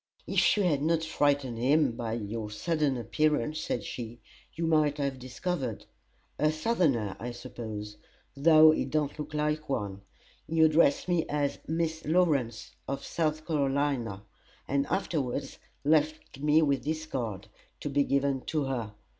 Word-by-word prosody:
"If -, -, +3 dB
you 205 Hz, -, +2 dB
had 150 Hz, -6 st, +2 dB
not 160 Hz, +1 st, +1 dB
frightened 140 Hz, -6 st, +1 dB
him 140 Hz, +2 st, +3 dB
by 115 Hz, -1 st, -4 dB
your 110 Hz, -1 st, -4 dB
sudden 150 Hz, +4 st, 0 dB
appearance," 150 Hz, +3 st, 0 dB
said 120 Hz, -, -2 dB
she, 120 Hz, +2 st, -6 dB, 0.4 s
"you 165 Hz, -, -1 dB
might 155 Hz, -2 st, +3 dB
have 140 Hz, -2 st, -2 dB
discovered. 130 Hz, -, -4 dB, 0.5 s
A 155 Hz, 0 st, +3 dB
Southerner, 155 Hz, -, +1 dB
I 120 Hz, -, -4 dB
suppose, 110 Hz, -4 st, -7 dB, 0.4 s
though 155 Hz, +2 st, +7 dB
he -, -, 0 dB
don't 150 Hz, -1 st, -1 dB
look 150 Hz, 0 st, -5 dB
like 150 Hz, 0 st, -1 dB
one. 100 Hz, -7 st, -2 dB, 0.5 s
He 160 Hz, +1 st, +1 dB
addressed 155 Hz, -1 st, +4 dB
me 175 Hz, -2 st, +1 dB
as 145 Hz, -1 st, -1 dB
Miss 160 Hz, 0 st, -1 dB
Lawrence, 145 Hz, -9 st, +1 dB, 0.2 s
of 135 Hz, +1 st, -4 dB
South 155 Hz, -1 st, -1 dB
Carolina, 135 Hz, -, 0 dB, 0.4 s
and 140 Hz, +1 st, +1 dB
afterwards 140 Hz, -7 st, -2 dB, 0.3 s
left 155 Hz, -2 st, +1 dB
me 150 Hz, +2 st, +4 dB
his 155 Hz, +3 st, -3 dB
card, 110 Hz, -9 st, -4 dB, 0.3 s
to -, -, -3 dB
be 140 Hz, 0 st, +2 dB
given 140 Hz, -1 st, +1 dB
to 155 Hz, -2 st, 0 dB
her. 120 Hz, -6 st, -3 dB
145 Hz, 145 wpm, -29 LUFS, 120-155 Hz, 0.5 s, though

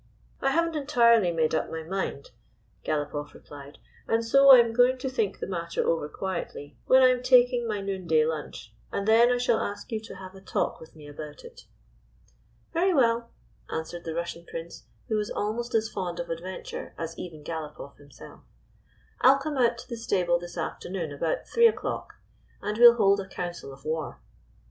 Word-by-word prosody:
" -, -, -33 dB
I 270 Hz, -, +2 dB
have 335 Hz, +4 st, +2 dB
n't 325 Hz, -, -8 dB
entirely 235 Hz, -, +4 dB
made 160 Hz, -2 st, 0 dB
up 160 Hz, -, 0 dB
my 160 Hz, 0 st, -5 dB
mind," 170 Hz, -5 st, -4 dB, 0.5 s
Galopoff 145 Hz, -1 st, -3 dB
replied, 145 Hz, 0 st, -12 dB, 0.2 s
" -, -, -29 dB
and 225 Hz, 0 st, +1 dB
so 275 Hz, +4 st, +5 dB
I 265 Hz, -, +12 dB
am 230 Hz, -1 st, +3 dB
going 250 Hz, +2 st, +4 dB
to 260 Hz, +1 st, -3 dB
think 220 Hz, -6 st, -1 dB
the -, -, -5 dB
matter 170 Hz, -3 st, -3 dB
over 160 Hz, -3 st, 0 dB
quietly 170 Hz, -5 st, -5 dB
when 260 Hz, 0 st, +6 dB
I 255 Hz, -, +7 dB
am 250 Hz, -1 st, +1 dB
taking 250 Hz, -1 st, +4 dB
my 210 Hz, -2 st, -2 dB
noonday 180 Hz, -6 st, +1 dB
lunch, 150 Hz, -8 st, -5 dB, 0.2 s
and 200 Hz, -, -3 dB
then 230 Hz, +2 st, +6 dB
I 245 Hz, -, +2 dB
shall 245 Hz, -2 st, +1 dB
ask 205 Hz, +3 st, -5 dB
you 220 Hz, -, -1 dB
to 220 Hz, -, -11 dB
have 185 Hz, 0 st, -10 dB
a 190 Hz, -, -13 dB
talk -, -, -2 dB
with 160 Hz, -, -14 dB
me 150 Hz, -2 st, -12 dB
about 145 Hz, +1 st, -9 dB
it." 480 Hz, +1 st, -13 dB, 0.5 s
" -, -, -35 dB
Very 360 Hz, +2 st, +2 dB
well," 235 Hz, -3 st, +2 dB, 0.4 s
answered 170 Hz, +2 st, -5 dB
the 165 Hz, -1 st, -5 dB
Russian 170 Hz, 0 st, -4 dB
Prince, 165 Hz, 0 st, -9 dB, 0.2 s
who 220 Hz, -3 st, 0 dB
was 210 Hz, -1 st, -2 dB
almost 230 Hz, +3 st, -3 dB
as 220 Hz, 0 st, +2 dB
fond 180 Hz, -5 st, -5 dB
of 170 Hz, -1 st, -4 dB
adventure 180 Hz, +3 st, -6 dB
as 165 Hz, 0 st, -5 dB
even 155 Hz, -4 st, -8 dB
Galopoff 150 Hz, -3 st, -7 dB
himself. 145 Hz, -2 st, -14 dB, 0.8 s
"I 255 Hz, -, +8 dB
'll -, -, 0 dB
come 275 Hz, 0 st, -4 dB
out 235 Hz, -1 st, +3 dB
to 240 Hz, -, -10 dB
the 235 Hz, -2 st, -6 dB
stable 180 Hz, -6 st, +1 dB
this 175 Hz, 0 st, -9 dB
afternoon 170 Hz, 0 st, -4 dB
about 155 Hz, +3 st, -2 dB
three 470 Hz, 0 st, +5 dB
o'clock, 450 Hz, -, -3 dB, 0.4 s
and 210 Hz, -, -3 dB
we 240 Hz, +2 st, +9 dB
'll 235 Hz, -, +7 dB
hold 200 Hz, -3 st, +3 dB
a 190 Hz, -, -5 dB
council 175 Hz, -6 st, -6 dB
of 135 Hz, 0 st, -15 dB
war." 155 Hz, -, -3 dB
195 Hz, 200 wpm, -27 LUFS, 160-240 Hz, 0.8 s, I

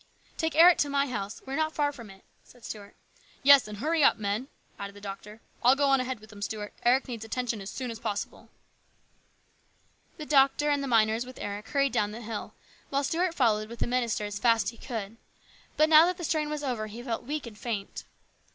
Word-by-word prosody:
" -, -, -35 dB
Take 320 Hz, -2 st, -1 dB
Eric 340 Hz, +2 st, +7 dB
to 290 Hz, -, +2 dB
my 280 Hz, 0 st, +2 dB
house; 215 Hz, -6 st, -5 dB
we 265 Hz, -, -6 dB
are -, -, 0 dB
not 315 Hz, +1 st, 0 dB
far 290 Hz, -1 st, +1 dB
from 235 Hz, -7 st, -11 dB
it," 195 Hz, 0 st, -15 dB, 0.2 s
said 245 Hz, -2 st, -17 dB
Stuart. 205 Hz, -1 st, -8 dB, 0.3 s
" -, -, -29 dB
Yes, 280 Hz, -2 st, +7 dB
and 210 Hz, -1 st, -7 dB
hurry 310 Hz, +6 st, +1 dB
up, -, -, +5 dB
men," 210 Hz, +5 st, -2 dB, 0.3 s
added 200 Hz, 0 st, -6 dB
the -, -, -11 dB
doctor. 205 Hz, +2 st, -9 dB
" -, -, -28 dB
I'll 250 Hz, +2 st, +6 dB
go 280 Hz, 0 st, +2 dB
on 270 Hz, -1 st, +4 dB
ahead 255 Hz, -2 st, -4 dB
with 215 Hz, +1 st, -15 dB
them, 205 Hz, -1 st, -12 dB
Stuart. 210 Hz, 0 st, -4 dB
Eric 250 Hz, +3 st, +3 dB
needs 235 Hz, -3 st, -6 dB
attention 230 Hz, -1 st, -3 dB
as 195 Hz, -, -7 dB
soon 255 Hz, -3 st, -5 dB
as 225 Hz, -, -8 dB
possible." 205 Hz, -1 st, -5 dB, 1.7 s
The 305 Hz, -, -6 dB
doctor 290 Hz, +1 st, +3 dB
and 285 Hz, -1 st, +1 dB
the 275 Hz, -, -3 dB
miners 225 Hz, -1 st, +3 dB
with 255 Hz, +1 st, -11 dB
Eric 205 Hz, +1 st, -5 dB
hurried 275 Hz, -3 st, +1 dB
down 210 Hz, -4 st, +1 dB
the 230 Hz, -, -7 dB
hill, 220 Hz, -1 st, -6 dB, 0.3 s
while 280 Hz, +1 st, 0 dB
Stuart 335 Hz, +4 st, 0 dB
followed 215 Hz, -5 st, +2 dB
with 235 Hz, -, -8 dB
the -, -, -1 dB
minister 240 Hz, -4 st, -1 dB
as 205 Hz, -1 st, -5 dB
fast 230 Hz, -1 st, +3 dB
as -, -, 0 dB
he 230 Hz, -, -17 dB
could. 225 Hz, -3 st, -6 dB, 0.6 s
But 310 Hz, -, +5 dB
now 315 Hz, +1 st, +8 dB
that 360 Hz, 0 st, -1 dB
the 350 Hz, -, -7 dB
strain 310 Hz, -1 st, 0 dB
was 300 Hz, -1 st, -4 dB
over 240 Hz, -6 st, -2 dB
he 225 Hz, +3 st, -9 dB
felt 235 Hz, -3 st, -3 dB
weak 295 Hz, +2 st, -3 dB
and 230 Hz, -3 st, -9 dB
faint. 215 Hz, -3 st, -5 dB
240 Hz, 235 wpm, -28 LUFS, 215-280 Hz, 1.7 s, now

